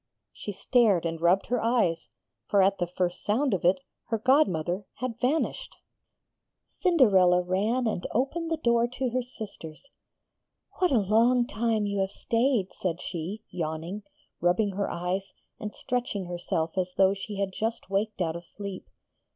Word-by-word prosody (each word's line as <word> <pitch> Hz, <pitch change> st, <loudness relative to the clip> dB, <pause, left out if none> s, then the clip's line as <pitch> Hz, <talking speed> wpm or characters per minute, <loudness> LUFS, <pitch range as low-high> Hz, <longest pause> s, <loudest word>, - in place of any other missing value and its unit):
She 205 Hz, -, -6 dB
stared 205 Hz, -4 st, +3 dB
and 165 Hz, -1 st, -3 dB
rubbed 175 Hz, +3 st, +4 dB
her 245 Hz, -1 st, 0 dB
eyes, 225 Hz, -8 st, +1 dB, 0.4 s
for 200 Hz, -2 st, +4 dB
at 195 Hz, 0 st, +2 dB
the 175 Hz, -, 0 dB
first 180 Hz, 0 st, -2 dB
sound 240 Hz, +4 st, +1 dB
of 185 Hz, -, -1 dB
it 180 Hz, +6 st, +4 dB, 0.3 s
her 225 Hz, -, -1 dB
godmother 200 Hz, -, +2 dB
had 245 Hz, -1 st, -4 dB
vanished! 285 Hz, +6 st, -1 dB, 0.9 s
Cinderella 200 Hz, -, +4 dB
ran 210 Hz, +8 st, 0 dB
and 210 Hz, -6 st, -1 dB
opened 300 Hz, +7 st, -1 dB
the 325 Hz, -, 0 dB
door 235 Hz, -5 st, +2 dB
to 255 Hz, 0 st, -3 dB
her 255 Hz, +1 st, +1 dB
sisters. 215 Hz, -, -10 dB, 0.9 s
'What 365 Hz, -1 st, +4 dB
a 265 Hz, -, +3 dB
long 230 Hz, +4 st, +4 dB
time 220 Hz, -1 st, 0 dB
you 200 Hz, -1 st, -1 dB
have 190 Hz, 0 st, +1 dB
stayed,' 230 Hz, -3 st, 0 dB
said 175 Hz, -2 st, -2 dB
she, 185 Hz, +5 st, -5 dB
yawning, 165 Hz, +4 st, -4 dB, 0.4 s
rubbing 180 Hz, +4 st, +2 dB
her 200 Hz, +1 st, -2 dB
eyes, 180 Hz, +3 st, -3 dB, 0.3 s
and 210 Hz, 0 st, -6 dB
stretching 240 Hz, -6 st, -2 dB
herself 175 Hz, 0 st, -2 dB
as 180 Hz, 0 st, -2 dB
though 190 Hz, 0 st, +5 dB
she 200 Hz, +1 st, -6 dB
had 195 Hz, -1 st, -1 dB
just 225 Hz, -2 st, -3 dB
waked 205 Hz, 0 st, -1 dB
out 165 Hz, -2 st, 0 dB
of 170 Hz, -, -6 dB
sleep. 200 Hz, +2 st, -8 dB
200 Hz, 160 wpm, -27 LUFS, 180-235 Hz, 0.9 s, though